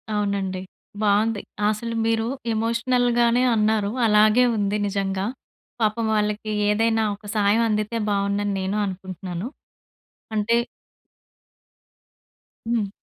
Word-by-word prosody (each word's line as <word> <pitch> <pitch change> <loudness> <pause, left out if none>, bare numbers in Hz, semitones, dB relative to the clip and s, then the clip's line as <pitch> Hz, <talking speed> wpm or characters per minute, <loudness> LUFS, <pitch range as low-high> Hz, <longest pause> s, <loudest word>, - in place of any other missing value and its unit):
అవునండి. 200 -2 -1 0.4
బావుంది. 210 +1 +2 0.3
అసలు 230 +2 -3
మీరు 225 0 +1 0.3
ఎమోషనల్‌గానే 235 +1 +2
అన్నారు. 215 -1 +1
అలాగే 215 +2 +5
ఉంది 205 0 0
నిజంగా. 195 -1 -1 0.6
పాపం 220 +1 +1
వాళ్ళకి 210 0 -1 0.2
ఏదైనా 225 +1 +2
ఒక 205 - -20
సహాయం 210 +2 +3
అందితే 215 +2 -1
బావుండని 200 0 0
నేను 190 +2 -1
అనుకుంటున్నాను. 185 0 -5 0.9
అంటే 215 +2 +2 2.1
హ్మ్. 230 -4 0
210 Hz, 90 wpm, -23 LUFS, 200-225 Hz, 2.1 s, అలాగే